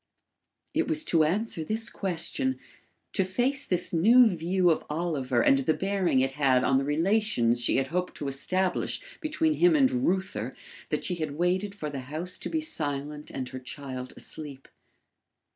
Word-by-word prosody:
It - - +1
was 315 -1 +1
to 165 - +3
answer 180 +1 0
this 220 +6 0
question 210 - -1 0.6
to 190 - +2
face 245 +9 -1
this 180 -1 -1
new 230 +10 +6
view 180 -2 +2
of 160 - 0
Oliver 150 -7 0
and 135 - +5
the 155 +3 +1
bearing 190 -8 +1
it 135 0 +1
had 135 -2 +2
on 135 - +3
the 135 - +1
relations 150 - +1
she - - +3
had 135 0 0
hoped 180 +3 -2
to 145 - -4
establish 180 +7 0 0.2
between 315 -1 0
him 345 +1 +4
and 270 -3 +4
Reuther, 195 -6 -1 0.3
that - - -1
she 180 - -1
had 155 -3 -4
waited 185 +4 0
for 150 -7 -5
the 140 - -4
house 180 +5 -3
to - - -5
be 320 - -1
silent 150 - -4
and 130 -1 -5
her 130 - -7
child 130 0 -7
asleep. 140 -4 -6
175 Hz, 170 wpm, -27 LUFS, 140-205 Hz, 0.6 s, new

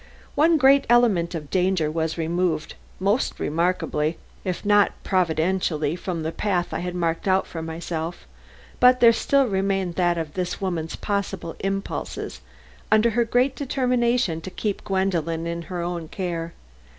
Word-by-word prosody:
One 320 +3 +4
great 275 -1 +5
element 205 -8 +3
of 150 -3 -6
danger 180 -4 +1
was 160 0 -2
removed 165 -1 -1 0.3
most 200 +6 0
remarkably, 165 -1 0 0.3
if 185 +2 -3
not 205 0 +4
providentially, 165 -3 +1
from 175 -2 -4
the 160 - -2
path 180 -2 -1
I - - -1
had 180 0 -4
marked 170 +1 -1
out 190 0 +3
for 165 - -6
myself; 165 +1 -5 0.5
but 250 0 +6
there 230 -1 +7
still 275 +4 +2
remained 195 -4 0
that 175 -2 +2
of 160 -2 -4
this 180 -1 -3
woman's 170 -4 -3
possible 195 -4 -3
impulses 195 0 -4 0.5
under 215 +2 +5
her 235 +2 +2
great 250 +4 +2
determination 245 - +1
to 185 - -6
keep 205 +1 -3
Gwendolen 170 -4 -1
in 170 0 -3
her 175 -2 -3
own 170 -2 -4
care. 170 -2 -4
180 Hz, 150 wpm, -24 LUFS, 165-205 Hz, 0.5 s, there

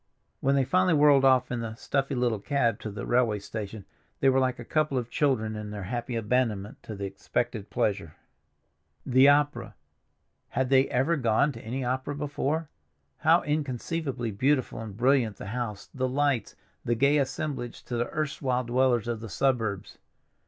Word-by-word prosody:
When 135 +1 +2
they 135 - +3
finally 185 +2 +3
whirled 145 -2 +5
off 130 -1 +4
in 120 - -1
the 110 -1 -5
stuffy 135 +3 -1
little 120 -4 0
cab 115 -1 0
to 110 - -5
the 100 -1 -6
railway 120 -3 +2
station 105 0 -7 0.3
they 135 - +4
were 135 0 +3
like 130 -1 +1
a 120 - -9
couple 155 -2 0
of 120 -1 -3
children 110 -7 +1
in 105 -1 -6
their 105 -1 -6
happy 120 +4 -4
abandonment 110 -3 -1
to 110 - -7
the 100 0 -4
expected 105 +2 -3
pleasure. 95 -7 -1 0.9
The 130 +2 +6
opera—had 145 -3 -2
they 135 0 +5
ever 140 +7 +1
gone 125 +3 +2
to 115 -4 -10
any 125 +4 -4
opera 130 +3 -2
before? 150 +2 -2 0.5
How - - +4
inconceivably 140 -3 -2
beautiful 130 +3 0
and 105 -3 -8
brilliant 125 -4 +2
the - - -8
house, 110 -1 -4
the 130 -1 -1
lights, 140 -2 0 0.3
the 120 - 0
gay 140 +5 +3
assemblage 135 -3 -3
to 120 - -5
the 120 0 -1
erstwhile 135 -4 -1
dwellers 120 -1 +1
of 120 -2 -2
the 115 0 -8
suburbs! 110 -3 -1
125 Hz, 165 wpm, -27 LUFS, 110-140 Hz, 0.9 s, The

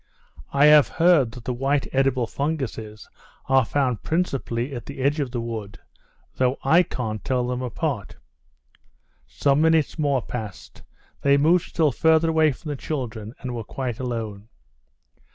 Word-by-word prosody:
"I 140 +1 +4
have 150 -1 +7
heard 165 -8 +3
that 125 - -10
the 125 - -1
white 135 +3 0
edible 135 -2 +2
funguses 115 -7 -4 0.4
are 135 -1 +4
found 125 -1 -1
principally 140 -6 -2
at 120 -3 -7
the 140 - -8
edge 140 +3 +1
of 140 -3 -1
the 120 -1 -4
wood, 115 -3 -6 0.6
though 130 +1 +1
I 160 +6 +5
can't 110 - -4
tell 125 -2 0
them 125 0 -3
apart." 125 - -3 1.1
Some 140 +1 +1
minutes 160 -1 +2
more 140 -4 +1
passed, 110 -6 -8 0.4
they 140 0 +4
moved 165 +5 +3
still 155 -4 +2
further 160 +4 +3
away 160 -1 +4
from 150 +4 -9
the 145 - -2
children, 120 -6 -5
and 130 -2 -4
were 115 -2 -4
quite 125 +1 -5
alone. 115 -4 -5
135 Hz, 150 wpm, -24 LUFS, 120-150 Hz, 1.1 s, have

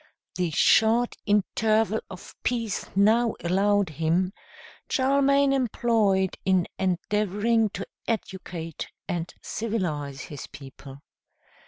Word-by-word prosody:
The 180 -2 -1
short 225 +9 +3
interval 215 +2 +2
of - - -10
peace 230 -4 -2
now 220 +4 +3
allowed 200 +2 +2
him, 165 +5 0 0.6
Charlemagne 275 +1 +3
employed 220 -7 +1
in 185 -2 +2
endeavoring 210 +4 +1
to 195 0 -6 0.2
educate 175 -7 -4 0.2
and 175 -1 -3
civilize 155 -11 -3
his 145 -3 -8
people. 135 0 -12
200 Hz, 95 wpm, -26 LUFS, 175-225 Hz, 0.6 s, short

